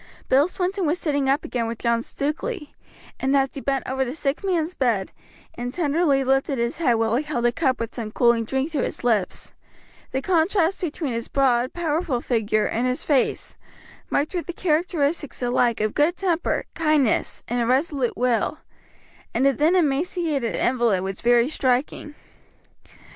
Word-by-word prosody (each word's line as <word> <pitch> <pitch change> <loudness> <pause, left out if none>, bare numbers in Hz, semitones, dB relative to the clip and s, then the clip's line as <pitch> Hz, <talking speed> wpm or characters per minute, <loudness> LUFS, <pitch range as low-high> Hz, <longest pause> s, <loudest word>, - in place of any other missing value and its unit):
Bill 275 +4 +5
Swinton 370 -1 -2
was 315 +4 +1
sitting 285 -5 0
up 275 +2 +1
again 235 -2 -2
with 230 0 -4
John 235 0 +1
Stukeley, 300 - -4 0.5
and 270 +1 +2
as 270 0 +2
he 275 - -6
bent 275 0 -1
over 265 0 0
the 255 +2 -4
sick 290 +2 -2
man's 355 -3 0
bed 230 - 0 0.4
and 245 +1 -5
tenderly 295 -3 +1
lifted 270 +1 +1
his 235 0 -1
head 280 -8 +2
while 225 0 +1
he 285 - -1
held 285 -6 -2
a 240 - +4
cup 260 -2 0
with 230 0 -4
some 225 -3 -5
cooling 235 +1 +3
drink 265 +7 -2
to 300 - 0
his - - -4
lips, 215 -6 0 0.6
the 265 - 0
contrast 350 +3 +1
between 310 -5 -3
his 230 0 -3
broad, 255 -2 +2
powerful 320 -5 -1
figure, 220 -3 0
and 240 +3 0
his 250 0 -1
face, 280 -4 0 0.6
marked 290 +5 0
with 350 -2 -3
the 350 - -4
characteristics 315 -4 0
alike 245 -1 +1
of 215 0 0
good 310 +4 +2
temper, 350 -3 0
kindness, 305 -7 +1
and 240 +1 -1
a 230 - 0
resolute 270 0 0
will, 245 +3 +1 0.8
and 265 - +2
the 275 - +5
thin, 310 +7 +2
emaciated 305 -4 0
invalid 235 -7 +1
was 190 0 -5
very 240 0 +4
striking. 275 +1 -1
270 Hz, 170 wpm, -23 LUFS, 240-315 Hz, 0.8 s, Bill